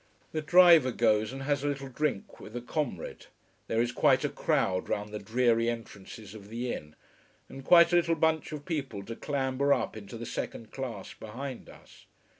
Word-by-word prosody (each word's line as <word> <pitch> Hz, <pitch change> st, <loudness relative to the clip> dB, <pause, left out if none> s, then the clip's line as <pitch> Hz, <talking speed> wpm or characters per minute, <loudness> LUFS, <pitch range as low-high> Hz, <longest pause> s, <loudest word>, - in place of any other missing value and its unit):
The 155 Hz, -, -2 dB
driver 170 Hz, -4 st, +7 dB
goes 110 Hz, -2 st, +2 dB
and 135 Hz, +1 st, -6 dB
has 140 Hz, -1 st, 0 dB
a -, -, 0 dB
little 140 Hz, -1 st, -3 dB
drink 135 Hz, -5 st, -3 dB
with 110 Hz, -, -11 dB
a 120 Hz, -, -3 dB
comrade. 125 Hz, -, -4 dB, 0.4 s
There 115 Hz, -, 0 dB
is 120 Hz, +1 st, +1 dB
quite -, -, +3 dB
a -, -, 0 dB
crowd 90 Hz, -1 st, 0 dB
round 105 Hz, 0 st, -2 dB
the 105 Hz, -, -5 dB
dreary 115 Hz, +2 st, +2 dB
entrances 110 Hz, -3 st, -8 dB
of 105 Hz, -2 st, -12 dB
the 120 Hz, +2 st, -3 dB
inn. 75 Hz, 0 st, -8 dB, 0.5 s
And 135 Hz, -, -10 dB
quite 170 Hz, +3 st, +6 dB
a -, -, +6 dB
little 170 Hz, -1 st, +2 dB
bunch 160 Hz, 0 st, +1 dB
of 150 Hz, -1 st, -7 dB
people 135 Hz, -, -3 dB
to 115 Hz, +3 st, -7 dB
clamber 140 Hz, 0 st, -1 dB
up -, -, +1 dB
into 110 Hz, +2 st, -8 dB
the 120 Hz, -, -6 dB
second 115 Hz, 0 st, -5 dB
class, 120 Hz, -7 st, -6 dB
behind 125 Hz, +4 st, -7 dB
us. -, -, -17 dB
125 Hz, 190 wpm, -29 LUFS, 110-145 Hz, 0.5 s, driver